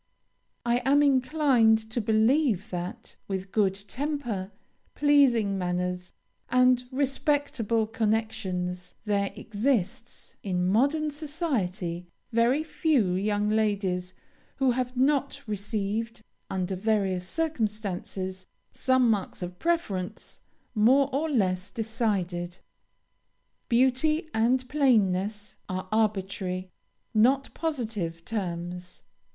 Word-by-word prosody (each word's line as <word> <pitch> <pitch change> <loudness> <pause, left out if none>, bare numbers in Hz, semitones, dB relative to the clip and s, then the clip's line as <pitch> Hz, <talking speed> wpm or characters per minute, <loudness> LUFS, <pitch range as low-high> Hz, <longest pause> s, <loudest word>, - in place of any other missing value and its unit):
I 240 0 +3
am 275 +4 +3
inclined 260 -4 +4
to 235 - -1
believe 220 - +2
that, 185 +6 -6
with 190 -1 -4
good 195 -3 +2
temper, 245 -7 -3 0.4
pleasing 245 -9 +4
manners, 180 0 -2 0.4
and 250 0 +4
respectable 270 -4 0
connections, 215 -5 -2
there 200 -2 +1
exists, 225 +1 -2
in 180 -2 -1
modern 285 +9 +2
society, 235 - -2 0.2
very 240 +6 +3
few 285 - +1
young 205 +2 0
ladies 195 -4 0 0.4
who 265 -2 +2
have 250 +1 -2
not 280 +1 +2
received 215 +2 -3 0.3
under 190 0 -2
various 190 -3 0
circumstances, 205 - -3 0.2
some 260 -1 +3
marks 205 -4 -1
of 180 0 -7
preference, 270 - -2 0.3
more 260 +5 +4
or 310 +4 0
less 190 -7 0
decided. 195 -6 -2 1.1
Beauty 265 +6 +2
and 250 +3 +2
plainness 210 -7 +1
are 185 +1 -3
arbitrary, 190 -4 -1 0.4
not 260 +5 +3
positive, 215 - -3
terms. 180 -3 -5
220 Hz, 95 wpm, -27 LUFS, 190-260 Hz, 1.1 s, inclined